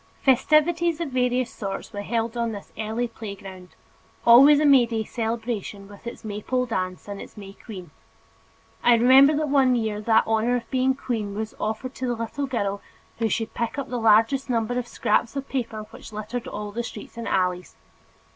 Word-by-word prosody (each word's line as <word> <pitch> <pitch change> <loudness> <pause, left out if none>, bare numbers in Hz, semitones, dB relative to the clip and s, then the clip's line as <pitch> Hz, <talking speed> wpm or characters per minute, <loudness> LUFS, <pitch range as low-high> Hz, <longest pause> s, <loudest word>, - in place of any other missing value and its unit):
Festivities 315 +5 +3
of 335 -4 -2
various 250 -1 0
sorts 195 -2 -6
were 205 - -4
held 230 +2 -2
on 235 -1 -1
this 200 - -10
early 220 +3 -2
playground, 195 -6 -10 0.5
always 275 +5 +8
a 305 - +2
May 270 -4 +6
day 225 -1 -2
celebration 225 -3 -4
with 205 +3 -12
its 235 - -8
Maypole 215 +5 -2
dance 185 -6 -3
and 200 -1 -6
its - - -12
May 195 -1 -9
queen. 185 -6 -10 0.9
I 240 - +6
remember 265 +5 +6
that 305 0 -1
one 265 -3 +4
year 220 -3 -1
that 220 +1 +4
honor 225 +2 +1
of 240 - -4
being 260 0 +2
queen 220 -6 -3
was 220 +1 -4
offered 220 +5 -3
to 255 - -4
the 240 - 0
little 230 +5 -4
girl 200 -6 -2 0.4
who 225 -1 +1
should 225 +2 -2
pick 235 +4 -3
up 275 -1 -4
the 245 - -2
largest 225 +5 +3
number 240 +1 0
of 245 - -5
scraps 230 +2 0
of 275 0 -4
paper 235 -5 -3
which - - -11
littered 215 +3 -5
all 210 0 -5
the 235 +3 -3
streets 225 -2 -9
and 235 -1 -6
alleys. 180 -1 -1
230 Hz, 185 wpm, -24 LUFS, 210-255 Hz, 0.9 s, always